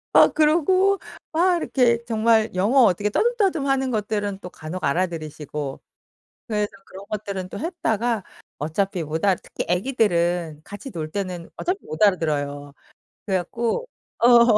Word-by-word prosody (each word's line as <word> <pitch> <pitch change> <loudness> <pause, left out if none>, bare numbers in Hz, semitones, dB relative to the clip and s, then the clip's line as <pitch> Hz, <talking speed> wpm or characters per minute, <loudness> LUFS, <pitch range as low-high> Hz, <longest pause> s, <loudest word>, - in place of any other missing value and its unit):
아, - - +9
그러고 370 +6 +3 0.3
막 350 +2 +3
이렇게 240 -7 +2
정말 225 -1 +3
영어 215 +9 +4
어떻게 205 -1 +3
떠듬떠듬 390 - +1
하는 265 -1 +1
것들은 205 -3 -2
또 180 - -7
간혹 160 +4 -7
알아들으시고. 150 -3 -2 0.7
그래서 210 -2 0 0.2
그런 195 +1 -11
것들은 200 -3 -4
또 200 - -7
했다가 235 - -1 0.3
어차피 175 +4 -1
못 155 +3 -3
알 195 -3 +4
특히 - - -5
애기들은 175 - +1
같이 205 +7 -8
놀 155 -6 -5
때는 185 -4 -4
어차피 365 +3 -1
못 155 +6 -4
알아들어요. 145 -7 +1 0.5
그래 190 -3 +1
갖고 230 - -2 0.3
어 235 -2 +7
205 Hz, 310 characters per minute, -23 LUFS, 175-245 Hz, 0.7 s, 아